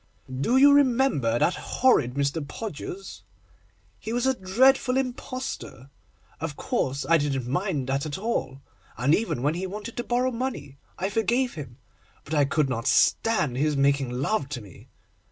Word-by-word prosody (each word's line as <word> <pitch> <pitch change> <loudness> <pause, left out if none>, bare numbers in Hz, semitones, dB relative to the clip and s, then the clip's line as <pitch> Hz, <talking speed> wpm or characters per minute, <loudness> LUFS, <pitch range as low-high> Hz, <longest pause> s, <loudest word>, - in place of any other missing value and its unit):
Do 240 - +2
you 285 +1 +7
remember 255 - +3
that 175 - +2
horrid 150 - +1
Mr. 140 +3 0
Podgers? 190 +3 -7 0.8
He 220 - -6
was 240 +2 0
a 265 - +3
dreadful 255 +5 +3
impostor. 255 - -5 0.5
Of - - -4
course, 135 +1 -2
I 165 0 +5
didn't 135 -4 -1
mind 150 0 -1
that 135 +3 -1
at 145 - -4
all, 165 - -3 0.3
and 130 +5 +2
even 185 - 0
when 145 +2 +2
he 185 +3 -3
wanted 210 +4 -7
to 240 - -1
borrow 250 +2 0
money 230 - -5 0.2
I 190 +3 -2
forgave 240 +4 +1
him, 135 -6 -9 0.5
but 155 - -7
I 145 -2 +4
could 140 +1 +1
not 115 -3 -3
stand 165 - +2
his 150 +1 +1
making 140 -1 +2
love 140 - -1
to 135 -4 -5
me. 100 -4 -15
165 Hz, 160 wpm, -26 LUFS, -, 0.8 s, you